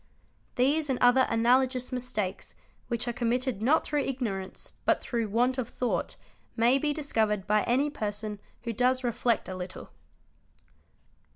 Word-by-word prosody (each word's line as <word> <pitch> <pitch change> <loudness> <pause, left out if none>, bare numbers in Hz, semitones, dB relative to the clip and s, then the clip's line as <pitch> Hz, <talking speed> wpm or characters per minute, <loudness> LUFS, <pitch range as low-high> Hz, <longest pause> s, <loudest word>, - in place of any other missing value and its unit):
These: 285 +4 +2
and 260 - +1
other 245 +2 +5
analogous 250 +3 +2
mistakes, 245 -7 -3 0.3
which 235 0 -3
are 240 - -1
committed 245 -1 -1
not 285 +8 +3
through 295 -1 0
ignorance 220 -9 -4
but - - +3
through 230 -3 -2
want 245 +5 +1
of 240 -2 -3
thought, 250 - -2 0.4
may 240 +4 +4
be 295 +1 0
discovered 220 -9 0
by 210 0 +3
any 275 +5 +2
person 210 -3 -4 0.2
who 235 -1 -3
does 255 +3 +2
reflect 240 -1 0
a 185 - -5
little. 185 0 -7
245 Hz, 145 wpm, -28 LUFS, 220-260 Hz, 0.4 s, other